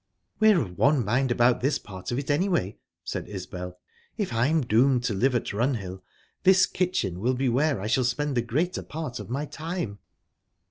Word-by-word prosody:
"We're 215 -4 +6
of 90 - -5
one 140 -4 +3
mind 130 +5 +1
about 120 0 +3
this 140 +4 +2
part 95 -2 -9
of 120 - -1
it, 140 0 -2
anyway," 155 - 0 0.2
said - - -5
Isbel. 90 -2 -6 0.4
"If 205 - -2
I'm 140 +8 +2
doomed 125 +1 +3
to 120 - 0
live 125 +6 +2
at 120 - -1
Runhill 100 -5 -2 0.4
this 190 -1 +6
kitchen 175 - -1
will 125 +5 +1
be 130 0 +1
where 140 +1 +1
I 100 - -5
shall 130 +4 +2
spend 140 +3 -1
the 120 - +2
greater 155 +11 -1
part 155 -6 -6
of - - -8
my 140 +5 -2
time." 155 - -5
125 Hz, 185 wpm, -26 LUFS, 110-150 Hz, 0.4 s, We're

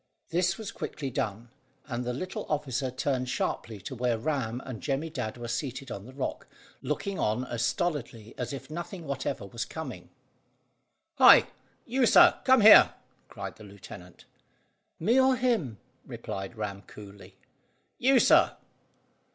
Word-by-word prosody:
This 180 +2 +1
was 215 -3 -6
quickly 140 -8 -5
done, 110 +1 -3 0.4
and 125 -3 -4
the 125 - -2
little 185 +10 -5
officer 135 -3 -1
turned 130 0 -2
sharply 110 -4 -3
to 130 - -7
where 120 -2 0
Ram 125 -3 -2
and 125 -4 -7
Jemmy 145 +3 -2
Dadd 125 -7 -4
were 120 0 -6
seated 130 +3 -4
on 100 +3 -7
the 130 - -12
rock, 135 - -4 0.3
looking 200 -1 -3
on 110 +4 0
as 120 -2 -3
stolidly 120 - -2
as 125 - -4
if 140 +2 -8
nothing 175 +1 -6
whatever 135 -5 -3
was 115 +4 -5
coming. 130 - -8 1.1
"Hi! - - +8 0.4
You, 250 0 +2
sir; 350 +7 +6
come 260 -2 +6
here!" 215 +1 +8 0.3
cried - - -7
the - - -13
lieutenant. 95 -3 -13 0.7
"Me, 230 +10 +3
or 260 0 +4
him?" 230 - 0 0.3
replied 105 -5 -6
Ram 100 -2 -4
coolly. 100 -1 -13 0.6
"You, 265 +1 +4
sir." - - +5
130 Hz, 145 wpm, -28 LUFS, 115-165 Hz, 1.1 s, Hi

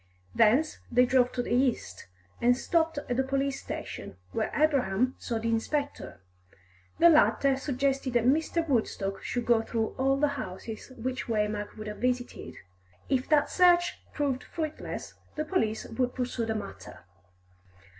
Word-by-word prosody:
Thence 250 +8 +3
they 250 +1 +5
drove 250 -1 +3
to 245 - -1
the - - -2
east, 245 - 0 0.3
and 245 +1 +4
stopped 325 +2 +1
at 245 +1 -1
a - - +4
police 275 +1 -1
station, - - -6 0.2
where - - -1
Abraham 260 -6 +2
saw 235 - -2
the 225 +1 -2
inspector. 255 - -2 0.8
The 340 - +7
latter 290 -4 +5
suggested 270 -1 -1
that 240 -1 +2
Mr. 320 +5 +2
Woodstock 210 -7 -1
should 245 -1 -3
go 235 -2 +4
through 225 -1 -1
all 270 +1 +3
the 295 +1 +2
houses 215 +7 -8
which 255 +3 -3
Waymark 210 -2 -1
would 215 - -7
have 210 -1 -6
visited; 250 0 -2 0.5
if 260 -1 0
that 300 -2 +3
search 350 -1 +4
proved 275 -4 -1
fruitless, 315 -2 -5 0.2
the 305 - -2
police 225 - 0
would 250 +2 -2
pursue 245 -2 -2
the 220 - -1
matter. 100 - -8
255 Hz, 150 wpm, -28 LUFS, 225-280 Hz, 0.8 s, The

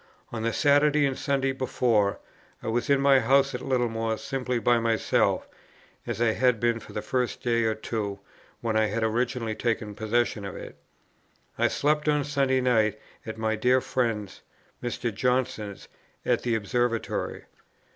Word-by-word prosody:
On 115 - -4
the 115 +1 0
Saturday 145 +1 +4
and 135 -1 0
Sunday 135 -1 0
before, 120 -6 +1 0.5
I - - -2
was 120 +5 -1
in 140 -1 +4
my 135 -1 +5
house 135 +3 +3
at 125 - -4
Littlemore 115 -4 0
simply 135 -2 -2
by 120 0 +3
myself, 115 -1 +1 0.6
as 120 -3 -3
I 120 -1 +3
had 125 0 +2
been 120 0 +1
for - - -13
the - - -4
first 125 -2 -2
day 115 -1 +2
or 110 -1 +1
two 105 -2 -4 0.4
when 115 -2 -1
I 110 0 +3
had 110 +2 -2
originally 115 0 0
taken 110 -2 -2
possession 110 +1 0
of 100 - -6
it. - - -9 0.8
I - - +2
slept 150 +1 +1
on 150 -1 +2
Sunday 135 -2 +1
night 110 -4 +2 0.3
at 110 - -5
my 110 0 0
dear 125 +4 +3
friend's, 115 -7 -2 0.4
Mr. 120 -1 -3
Johnson's, 125 -4 -1 0.4
at - - +2
the 120 -2 0
Observatory. 115 +2 -1
120 Hz, 160 wpm, -27 LUFS, 110-130 Hz, 0.8 s, my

